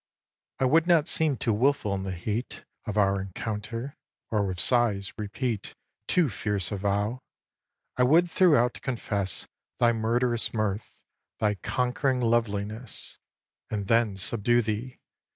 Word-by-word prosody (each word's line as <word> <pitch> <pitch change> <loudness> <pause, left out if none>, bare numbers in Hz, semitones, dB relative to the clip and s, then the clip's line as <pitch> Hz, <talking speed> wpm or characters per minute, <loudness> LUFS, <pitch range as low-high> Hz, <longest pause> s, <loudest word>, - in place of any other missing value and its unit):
xi. - - -67
I - - +4
would 160 +6 +4
not 170 -3 +4
seem 155 -4 +2
too 115 - +1
wilful 120 -2 +1
in 95 - -2
the 95 0 -4
heat 105 +7 -4 0.2
Of 105 0 -3
our 100 -1 +3
encounter, 110 - -5 0.3
or 105 -2 +2
with 90 -2 -4
sighs 110 -6 +2
repeat 110 +1 -3 0.3
Too 175 -4 +3
fierce 105 -5 -1
a 100 - -2
vow. 105 +5 -1 0.8
I - - +2
would 165 +7 +4
throughout 150 -11 +3
confess 100 -8 -2 0.3
Thy 120 -1 +4
murderous 115 +1 0
mirth, 110 -1 -3 0.3
thy 105 -1 +1
conquering 125 +6 0
loveliness, 115 -1 -2 0.5
And 100 -2 -2
then 115 -3 +2
subdue 115 +5 +1
thee! 110 +4 -3
115 Hz, 135 wpm, -27 LUFS, 100-125 Hz, 0.8 s, I